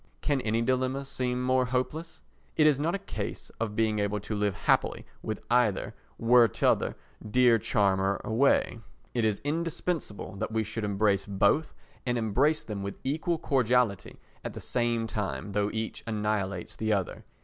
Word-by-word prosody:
Can 145 -3 +1
any 115 +1 0
dilemma 130 +2 0
seem 125 -2 -2
more 130 0 +3
hopeless? 130 +7 -3 0.3
It 155 - +4
is 150 -3 +4
not 165 +5 0
a 195 0 -7
case - - -5
of 110 -2 -2
being 110 -1 +1
able 105 0 0
to 105 - -4
live 105 -2 0
happily - - +2 0.2
with 110 - -4
either 120 -5 +2 0.2
were 120 0 +6
t'other 100 - +1 0.3
dear 115 +1 +4
charmer 95 -1 +1
away; 120 +1 +2 0.3
it 120 - 0
is 110 -2 +1
indispensable 160 - -3
that 95 - -3
we 110 0 +1
should 110 +1 -5
embrace 100 -1 +1
both, 100 +10 +2 0.3
and 120 -1 0
embrace 125 +8 +2
them 105 -3 -5
with 100 0 -5
equal 160 +5 0
cordiality 125 - +1 0.3
at - - -5
the - - -5
same 120 -2 0
time, 105 -2 -3
though 100 0 +1
each 110 0 -4
annihilates 105 -4 -2
the 110 0 -1
other. 100 -3 -1
115 Hz, 160 wpm, -28 LUFS, 105-130 Hz, 0.3 s, were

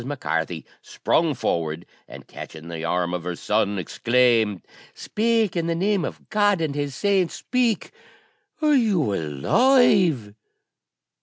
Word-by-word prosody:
Mac 140 +1 -6
Carthy 80 0 -2 0.2
sprung 160 -3 0
forward, 80 -4 -2 0.2
and - - -12
catching 80 +1 -10
the 80 -1 -6
arm 90 +1 -1
of 90 -2 -3
her 90 0 -4
son, 105 +2 0
exclaimed, 115 +1 +1 0.3
"Speak! 225 -3 0
in 170 -1 -1
the 165 - 0
name 195 +1 0
of - - -8
God 205 -3 +2
and 155 -3 -1
His 145 -2 -3
saints, 195 0 +1
speak! 245 -4 -1 0.7
are 300 -1 +4
you 200 - +2
alive?" 160 - +2
140 Hz, 135 wpm, -23 LUFS, -, 0.7 s, are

